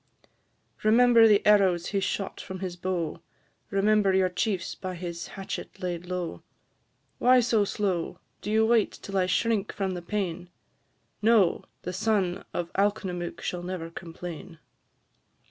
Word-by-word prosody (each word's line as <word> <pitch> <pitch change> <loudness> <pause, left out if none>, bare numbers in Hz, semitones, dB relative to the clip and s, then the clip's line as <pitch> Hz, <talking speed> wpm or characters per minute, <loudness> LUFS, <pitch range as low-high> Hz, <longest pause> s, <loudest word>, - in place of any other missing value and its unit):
Remember 230 +1 +6
the 210 -2 +4
arrows 190 -5 +4
he 200 - 0
shot 195 0 -3
from 190 - -7
his 185 -2 -4
bow; 175 -3 -2 0.5
Remember 200 -1 +3
your 190 -1 +3
chiefs 185 0 -1
by 185 -1 -6
his 170 -1 -5
hatchet 195 0 -6
laid 180 -2 -4
low. 180 -2 -4 0.8
Why 255 +1 +6
so 225 -3 +2
slow? 190 -4 -2 0.2
Do - - -5
you 220 +1 +4
wait 230 -2 +3
till 195 - -8
I 185 -1 +2
shrink 215 +2 +1
from 195 -2 -2
the 180 -1 -4
pain? 175 -2 -3 0.7
No! 215 -5 +4 0.2
the 180 - -4
son 190 -2 0
of 170 -1 -4
Alknomook 195 -4 -1
shall 180 - -3
never 175 -2 -5
complain. 170 0 -8
190 Hz, 140 wpm, -27 LUFS, 175-210 Hz, 0.8 s, Remember